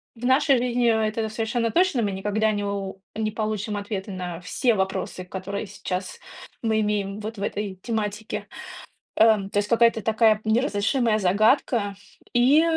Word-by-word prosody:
в 235 +1 -7
нашей 265 +1 +4
жизни 245 -1 +1 0.2
это 220 +1 -2
совершенно 225 +1 -1
точно, 340 - +2
мы 205 - 0
никогда 210 +3 0
не 205 -1 -2
у 195 -1 -4
не 215 0 -1
получим 215 -1 -2
ответа 200 0 -4
на 180 -2 -5
все 230 +6 +1
вопросы, 190 -1 -2
которые 190 +3 -5
сейчас 185 -1 -5 0.4
мы 220 -1 +2
имеем 205 -1 -1
вот 215 +1 -6
в - - -3
этой 205 -2 -3
тематике, 210 -2 -3 0.7
э, - - +8
то 210 -3 +3
есть 205 - +1
какая-то 230 -1 +3
такая 220 0 +3
неразрешимая 225 0 +1
загадка. 205 +2 +2 0.4
И, 265 +6 +5
215 Hz, 150 wpm, -24 LUFS, 200-230 Hz, 0.7 s, э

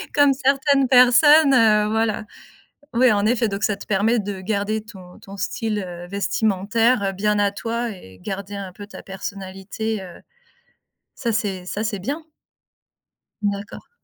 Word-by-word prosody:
comme 285 -2 +5
certaines 275 0 +2
personnes, 270 +4 +6
heu, 215 -3 +4
voilà. 220 -1 0 0.7
Oui, 250 0 +5
en 205 0 +1
effet, 230 0 +2
donc 200 0 -4
ça 210 - +1
te - - -11
permet 215 +4 +2
de 200 -2 -4
garder 210 +1 -1
ton 190 -5 -14
ton 195 0 -11
style, 215 +2 -2
heu, 175 0 -8
vestimentaire 205 +2 +1
bien 210 +2 0
à 200 -1 +2
toi 230 +3 -3
et 95 - -12
garder 200 - -6
un 195 -2 -6
peu 205 0 -10
ta - - -11
personnalité, 195 +2 -5
heu, 175 -2 -11 0.9
ça 235 -3 -2
c'est 195 -5 -2
ça 210 +4 -3
c'est 210 -2 -2
bien. 285 - -4 1.2
D'accord. 200 0 -4
210 Hz, 150 wpm, -22 LUFS, 195-230 Hz, 1.2 s, personnes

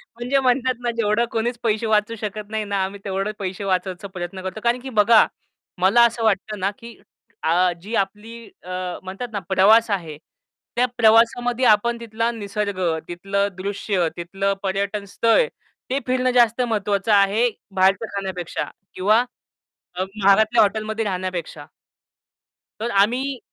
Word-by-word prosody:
म्हणजे 250 +4 0
म्हणतात 255 0 +1
ना 240 - 0
जेवढं 220 +1 +2
कोणीच 235 +2 -1
पैसे 220 0 0
वाचू 215 +1 +1
शकत 210 0 -5
नाही 220 -1 -2
ना, 200 -2 -1
आम्ही 195 +1 -5
तेवढे 195 +1 -2
पैसे 190 +1 -4
वाचायचा 185 0 -2
प्रयत्न 185 0 -6
करतो. 190 +3 -5
कारण 240 +1 +2
की 265 - -7
बघा, 220 0 +5 0.6
मला 215 +6 +5
असं 235 0 -1
वाटतं 210 0 0
ना 195 +2 0
की 235 0 -11 0.5
अ, 175 +3 +3
जी 220 +4 -5
आपली 210 +3 -2 0.3
अ, 180 - -11 0.3
म्हणतात 195 +6 -6
ना 200 - -1
प्रवास 215 +4 +5
आहे. 165 -6 -3 0.6
त्या 245 +1 +3
प्रवासामध्ये 235 +2 +3
आपण 235 +3 +3
तिथला 230 0 -2
निसर्ग, 205 -3 -4 0.3
तिथलं 195 +3 -1
दृश्य, 195 -2 -1
तिथलं 195 +3 -1
पर्यटन 200 +1 -2
स्थळ, 230 - +3 0.4
ते 270 +2 0
फिरणं 255 0 +1
जास्त 235 +1 +3
महत्वाचं 210 -3 0
आहे 205 +4 +4 0.3
बाहेरच्या 190 +3 +3
खाण्यापेक्षा 190 -3 -4 0.2
किंवा 210 +5 +3 0.8
अ, 185 - -2
महागातल्या 215 +3 +4
हॉटेलमध्ये 220 +1 -1
राहण्यापेक्षा. 180 -5 -4 1.1
तर 235 +2 -2
आम्ही 255 +6 0
210 Hz, 145 wpm, -22 LUFS, 195-230 Hz, 1.1 s, बघा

